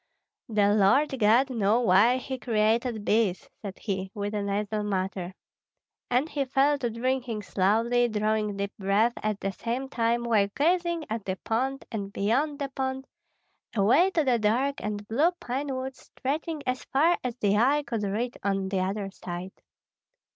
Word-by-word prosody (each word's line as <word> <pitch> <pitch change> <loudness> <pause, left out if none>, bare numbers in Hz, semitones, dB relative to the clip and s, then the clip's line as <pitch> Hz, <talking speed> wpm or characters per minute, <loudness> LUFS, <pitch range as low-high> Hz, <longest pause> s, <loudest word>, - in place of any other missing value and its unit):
"The 205 -2 +3
Lord 215 +9 +4
God 235 +5 +4
knew 220 -1 +2
why 230 +4 +5
he 260 0 -5
created 225 -1 0
bees," 210 -4 +1
said 200 -3 -7
he, 190 -3 -3
with 205 0 -3
a 210 - -1
nasal 205 +1 -1
mutter. 190 -2 -3 0.7
And 250 +5 +2
he 285 -3 -2
fell 275 +2 +2
to 245 -3 -1
drinking 235 -1 -2
slowly, 225 +6 +2
drawing 215 -1 0
deep 200 0 -3
breaths 205 +5 +2
at 215 -1 -1
the 195 - -2
same 245 +6 -4
time, 235 -1 0
while 220 -4 +3
gazing 340 +1 +1
at 220 -1 -4
the 190 - -2
pond 265 +4 -1
and 200 -3 -4
beyond 265 +10 0
the 280 -2 -3
pond, 265 0 -3 0.7
away 245 - +4
to 320 - +3
the 250 -4 +2
dark 250 +7 +1
and 205 -1 -4
blue 295 - +2
pine 265 +4 -3
woods 260 0 -5
stretching 300 +3 -4
as 255 0 -2
far 320 +6 +2
as 250 -2 -3
the 205 -3 +1
eye 280 +6 +3
could 230 -5 -3
reach 215 +5 -2
on 195 -1 -1
the 195 -1 0
other 195 +1 -2
side. 180 0 -7
230 Hz, 165 wpm, -27 LUFS, 205-265 Hz, 0.7 s, why